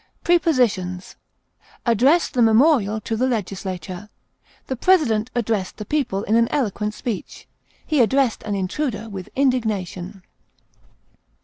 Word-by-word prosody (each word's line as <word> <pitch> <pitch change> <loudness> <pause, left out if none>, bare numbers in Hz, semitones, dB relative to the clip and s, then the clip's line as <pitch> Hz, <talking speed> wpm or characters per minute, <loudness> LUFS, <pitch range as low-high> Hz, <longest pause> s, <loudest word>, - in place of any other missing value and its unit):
Prepositions: 235 - +1 0.7
Address 260 +9 +3
the 250 - 0
memorial 225 -2 +4
to 225 - -3
the 255 +4 +1
legislature; 190 -4 -4 0.6
the 260 - -3
president 250 - +2
addressed 220 -5 -1
the 210 - -6
people 245 -9 -1
in 220 - +1
an 230 0 +4
eloquent 210 -5 -1
speech; 235 -7 -6 0.4
he 305 -4 +2
addressed 260 0 +2
an 205 -1 -3
intruder 215 +3 -2
with 190 -3 -7
indignation. 210 -8 -1
220 Hz, 115 wpm, -22 LUFS, 200-260 Hz, 0.7 s, memorial